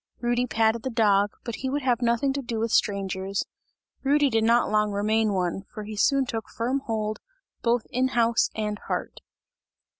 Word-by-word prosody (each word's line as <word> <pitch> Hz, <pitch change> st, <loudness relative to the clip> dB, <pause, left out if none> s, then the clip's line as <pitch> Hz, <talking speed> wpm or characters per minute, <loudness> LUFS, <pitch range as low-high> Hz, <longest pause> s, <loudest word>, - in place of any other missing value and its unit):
Rudy 240 Hz, +1 st, 0 dB
patted 225 Hz, 0 st, +2 dB
the 260 Hz, -, -3 dB
dog, 205 Hz, -4 st, +3 dB
but 235 Hz, -2 st, -5 dB
he 265 Hz, -, -3 dB
would 285 Hz, +1 st, -2 dB
have 250 Hz, -2 st, +1 dB
nothing 240 Hz, +3 st, +1 dB
to 280 Hz, -, -2 dB
do 235 Hz, -3 st, -4 dB
with 225 Hz, 0 st, -1 dB
strangers; 195 Hz, -1 st, 0 dB, 0.6 s
Rudy 285 Hz, 0 st, +3 dB
did 225 Hz, -1 st, +2 dB
not 235 Hz, 0 st, +3 dB
long 210 Hz, 0 st, +2 dB
remain 215 Hz, +2 st, +1 dB
one, 185 Hz, -1 st, -1 dB
for 215 Hz, -, -7 dB
he 215 Hz, +1 st, -7 dB
soon 275 Hz, +5 st, +3 dB
took 225 Hz, -3 st, -5 dB
firm 250 Hz, +4 st, -1 dB
hold 215 Hz, -1 st, -2 dB, 0.4 s
both 235 Hz, -1 st, +1 dB
in 255 Hz, +1 st, +2 dB
house 235 Hz, -2 st, +2 dB
and 210 Hz, -1 st, -2 dB
heart. -, -, -4 dB
225 Hz, 180 wpm, -26 LUFS, 210-245 Hz, 0.6 s, dog